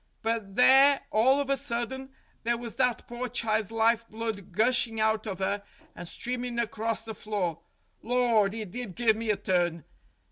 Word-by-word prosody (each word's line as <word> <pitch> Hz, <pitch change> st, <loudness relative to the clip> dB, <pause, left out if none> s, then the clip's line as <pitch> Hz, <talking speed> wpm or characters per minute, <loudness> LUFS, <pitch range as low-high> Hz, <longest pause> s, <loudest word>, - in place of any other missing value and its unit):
But 220 Hz, -3 st, -2 dB
there 270 Hz, +2 st, +6 dB
all 260 Hz, +6 st, +4 dB
of 285 Hz, -, -1 dB
a -, -, +4 dB
sudden 265 Hz, 0 st, -3 dB, 0.3 s
there 235 Hz, +1 st, 0 dB
was 235 Hz, -1 st, -8 dB
that 250 Hz, -2 st, +1 dB
pore 245 Hz, +1 st, -5 dB
child's 220 Hz, -3 st, 0 dB
life 230 Hz, +1 st, +2 dB
blood 220 Hz, -4 st, -4 dB
gushing 225 Hz, +3 st, +2 dB
out 220 Hz, 0 st, +1 dB
of 195 Hz, -2 st, -4 dB
'er 200 Hz, +1 st, -1 dB, 0.3 s
and 175 Hz, -, -8 dB
streamin' 245 Hz, +4 st, -4 dB
across 225 Hz, -1 st, -2 dB
the 220 Hz, -, -5 dB
floor. 200 Hz, -7 st, -3 dB, 0.4 s
Lor', 235 Hz, -3 st, +2 dB
it 210 Hz, -2 st, -6 dB
did 240 Hz, -5 st, -6 dB
give 230 Hz, -2 st, +3 dB
me 225 Hz, 0 st, -4 dB
a 210 Hz, -, +2 dB
turn. 175 Hz, -3 st, 0 dB
225 Hz, 170 wpm, -28 LUFS, 215-245 Hz, 0.4 s, there